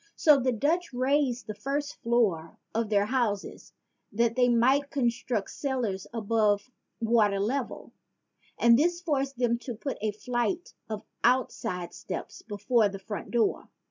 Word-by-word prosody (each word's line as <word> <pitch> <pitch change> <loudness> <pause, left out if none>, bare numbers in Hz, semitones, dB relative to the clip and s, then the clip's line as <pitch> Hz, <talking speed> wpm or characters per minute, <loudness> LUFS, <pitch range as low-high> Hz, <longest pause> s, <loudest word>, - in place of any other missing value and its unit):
So 300 -3 +5
the 255 0 +1
Dutch 310 +7 0
raised 255 0 +1
the 215 - -5
first 285 +6 -3
floor 210 -9 +1 0.2
of 225 -1 -1
their 205 -1 +3
houses 215 -4 -2 0.4
that 230 +1 +1
they 250 -1 +4
might 260 +4 +3
construct 235 -5 -1
cellars 240 -9 -2
above 215 0 +1 0.3
the 230 - -2
water 210 -4 +3
level; 240 +5 -2 0.7
and 235 +1 +6
this 345 +3 +2
forced 275 -6 -1
them 235 -1 +1
to 245 -1 -6
put 275 +5 -5
a 215 - +1
flight 245 - -2 0.2
of 215 -1 -4 0.2
outside 225 -8 0
steps - - -6
before 210 +1 +1
the 195 - -6
front 205 +1 -6
door. 235 -2 0
235 Hz, 145 wpm, -28 LUFS, 210-265 Hz, 0.7 s, and